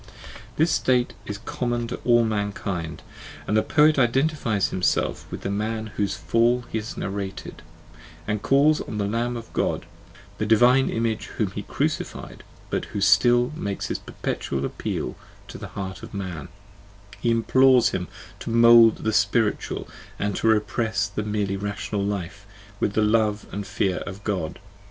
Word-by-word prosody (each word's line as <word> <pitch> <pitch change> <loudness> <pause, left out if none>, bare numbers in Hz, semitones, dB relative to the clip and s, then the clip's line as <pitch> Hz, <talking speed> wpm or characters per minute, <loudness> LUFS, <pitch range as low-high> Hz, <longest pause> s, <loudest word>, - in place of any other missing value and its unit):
This 160 +2 +2
state 125 -3 +2
is 105 - -4
common 120 +2 -2
to - - -4
all 120 -1 +4
mankind; 100 -6 -3 0.4
and 105 - 0
the 110 - +5
poet 150 +2 +4
identifies 130 -4 +1
himself 90 - 0
with - - -6
the 100 - -3
man 110 +1 -2
whose 100 -1 0
fall 120 +1 +2
he 110 - 0
has 110 +2 -7
narrated, 100 0 -5 0.7
and 105 -1 -1
calls 145 +5 +4
on 105 - -6
the 100 - 0
Lamb 120 +3 -1
of 115 -1 -10
God, - - -1 0.5
the 105 - 0
Divine 125 +4 +5
Image 115 -1 -1
whom - - 0
he - - -5
crucified, - - -3 0.3
but - - -1
who 105 - -5
still 120 +6 +4
makes 100 -10 -4
his - - -2
perpetual 70 0 -3
appeal - - -4 0.3
to - - -8
the - - -7
heart 95 -1 -5
of - - -9
man: 90 -7 -5 0.7
he 120 - 0
implores 125 +2 +4
him 90 -1 -3 0.3
to - - -6
mould 115 -1 +6
the 110 - 0
spiritual 105 +2 +1 0.3
and 100 -1 -1
to - - 0
repress 110 -2 +1
the 100 +1 -4
merely 105 -2 -1
rational 100 +1 -3
life 100 0 -4 0.3
with 100 - 0
the 110 - +2
love 105 -1 +2
and 100 0 -5
fear 100 -4 0
of 100 +1 -7
God. 95 -7 -2
105 Hz, 160 wpm, -24 LUFS, 100-120 Hz, 0.7 s, mould